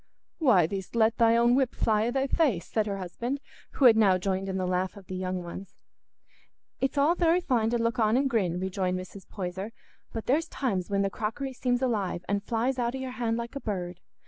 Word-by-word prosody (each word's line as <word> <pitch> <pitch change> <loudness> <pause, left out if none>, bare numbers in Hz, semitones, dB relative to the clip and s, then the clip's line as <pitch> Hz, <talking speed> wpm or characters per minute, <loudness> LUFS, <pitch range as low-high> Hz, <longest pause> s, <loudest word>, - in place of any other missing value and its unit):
"Why, 220 - +5
thee'st 190 +5 -5
let 225 0 +3
thy 230 0 +5
own 235 +1 +4
whip 260 -1 +1
fly 215 0 +2
i' - - +1
thy 270 +2 0
face," 270 - +1
said 215 -1 -1
her 200 -1 -2
husband, 235 +9 -4 0.3
who 275 - +2
had 235 -3 +9
now 200 -4 +5
joined 190 +1 -2
in 190 - -2
the 185 - -1
laugh 185 +2 -1
of 195 - -12
the 185 - -7
young 185 -1 -3
ones. 180 +3 -9 1.0
"It's 270 +2 -1
all 290 +4 +4
very 345 0 +3
fine 240 -10 +1
to 240 - +1
look 230 +2 -1
on 220 +1 +3
and 275 +1 +2
grin," 190 -9 0
rejoined 185 -1 -1
Mrs. 185 +1 -9
Poyser; 190 +2 -5 0.4
"but 225 - -5
there's 300 +6 +1
times 200 -9 -2
when 200 0 +1
the 195 - -1
crockery 230 +7 -3
seems 245 0 0
alive 200 -8 -1
an' 200 0 +1
flies 240 +5 -1
out 240 +1 0
o' - - -3
your 260 -1 -5
hand 235 -2 -1
like 235 +3 -5
a - - -2
bird. 180 -4 -4
220 Hz, 225 wpm, -28 LUFS, 190-250 Hz, 1.0 s, had